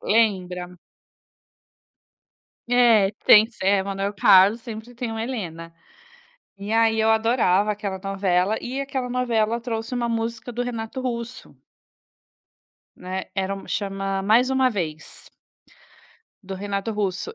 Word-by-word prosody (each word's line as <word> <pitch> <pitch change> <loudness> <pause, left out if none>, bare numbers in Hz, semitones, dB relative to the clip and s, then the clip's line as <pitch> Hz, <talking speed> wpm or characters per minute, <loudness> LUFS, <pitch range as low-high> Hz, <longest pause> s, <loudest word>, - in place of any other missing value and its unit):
Lembra? 180 -5 0 1.9
É, 230 -5 +4
tem 215 +1 +8
s 225 -4 -10
é, 195 0 +3
Manoel 195 +1 -3
Carlos 195 +3 +5
sempre 225 +1 -9
tem 240 -1 -4
uma 225 0 -4
Helena. 170 -9 -6 0.8
E 200 +2 -6
aí 225 0 +3
eu 220 0 +3
adorava 220 -3 +2
aquela 200 -2 -4
novela, 195 +1 0
e 260 +3 -4
aquela 265 -2 -3
novela 235 -2 0
trouxe 230 0 -4
uma 240 -1 -1
música 230 +1 -3
do 245 +1 -3
Renato 235 0 -5
Russo. 245 0 -5 1.4
Né, 185 +1 -5
era 195 0 -1
uma 195 - -11
chama 195 -1 -2
mais 230 +6 +3
uma 265 -1 +3
vez. 160 -8 -6 1.1
Do 190 0 -7
Renato 200 +2 -3
Russo. 205 - -3
215 Hz, 125 wpm, -23 LUFS, 195-235 Hz, 1.9 s, tem